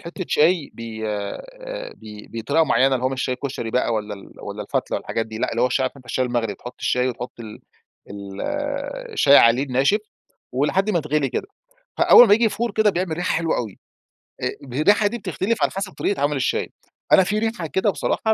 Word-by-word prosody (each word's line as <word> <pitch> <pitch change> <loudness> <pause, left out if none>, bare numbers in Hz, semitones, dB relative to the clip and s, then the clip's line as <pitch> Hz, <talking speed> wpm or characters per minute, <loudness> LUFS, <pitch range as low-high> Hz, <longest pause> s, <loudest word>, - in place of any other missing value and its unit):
حتة 175 +2 -6
شاي 160 0 +3
ب - - -12 0.3
آآ، - - -6
ب 105 -1 -11
بطريقة 145 +8 +2
معينة 135 -1 +3
اللي 125 - -2
هو 130 - +3
مش 130 0 -4
الشاي 125 -1 -1
كشري 130 -4 -4
بقى 125 -1 +1
والَّا 105 -2 -2
ال 100 - -14
والَّا - - -6
الفتلة - - -2
والحاجات 115 -1 -3
دي 110 0 -7
لأ، - - -1
اللي 115 +1 0
هو - - +5
الشاي 130 +1 0
عارف 130 +2 -2
أنت 130 - -15
الشاي 130 +1 -1
المغلي، 120 -4 -1
تحط 125 +6 -10
الشاي 125 +1 +1
وتحط 125 0 -6
ال 110 -2 -9 0.5
ال 100 -1 -8 0.7
الشاي 140 - +6
عليه 115 +3 +6
الناشف 135 +9 +2 0.5
ولحد 165 - +1
ما 175 - +2
يتغلي 150 -2 0
كده، 130 - -3 0.5
فأول 245 - +8
ما 205 - +5
ييجي 230 +2 +5
يفور 230 +2 0
كده 215 -1 +3
بيعمل 180 -2 -2
ريحة 175 - -1
حلوة 165 -1 0
أوي. 110 -6 -4 0.7
آآ - - 0 0.3
الريحة 205 +4 +4
دي 240 - -3
بتختلف 200 +2 -2
على - - +2
حسب 195 -1 -4
طريقة 200 -8 -2
عمل 145 +1 +1
الشاي. 130 - -1 0.4
أنا 190 - +7
في 210 +3 0
ريحة 220 -6 -2
كده 190 +8 +1
بصراحة 220 +3 0
140 Hz, 205 wpm, -22 LUFS, 120-195 Hz, 0.7 s, فأول